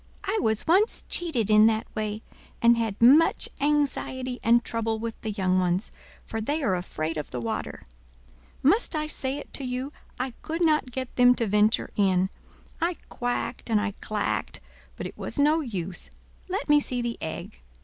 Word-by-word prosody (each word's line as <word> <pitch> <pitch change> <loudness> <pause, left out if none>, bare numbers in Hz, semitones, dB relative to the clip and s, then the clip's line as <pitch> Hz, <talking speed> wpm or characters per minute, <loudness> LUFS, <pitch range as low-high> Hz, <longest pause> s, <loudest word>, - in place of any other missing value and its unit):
I 410 +2 0
was 220 -1 0
once 385 +7 +3
cheated 250 - +1
in 215 +1 +7
that 220 0 +1
way, 215 0 -3 0.4
and 235 0 +6
had 225 -3 -2
much 280 +8 +6
anxiety 270 -3 0
and 235 +1 +4
trouble 225 -1 -1
with 225 0 -5
the 220 - -3
young 185 -3 +1
ones, 180 +3 0 0.3
for 225 - -4
they 295 +7 -1
are 220 -8 +2
afraid 165 -3 -3
of 150 - -4
the 125 - -4
water. 115 -1 -4 0.8
Must 335 - +3
I 305 0 0
say 275 -2 -3
it 290 - -10
to 275 - -3
you, 255 +3 -3 0.3
I 255 +1 -1
could 330 +2 -1
not 305 -4 +2
get 260 0 -6
them 250 0 +6
to 230 - +1
venture 210 +1 +2
in. 190 -1 +2 0.5
I 340 +1 +1
quacked 245 0 -3
and 220 -2 +3
I 210 0 -1
clacked, 215 -1 -2 0.4
but - - -6
it - - -8
was - - -5
no 300 +3 +4
use. 190 - -5 0.4
Let 385 +3 -2
me 295 -1 +6
see 250 -4 -2
the 235 -1 -3
egg. 155 - -6
235 Hz, 180 wpm, -26 LUFS, 210-290 Hz, 0.8 s, in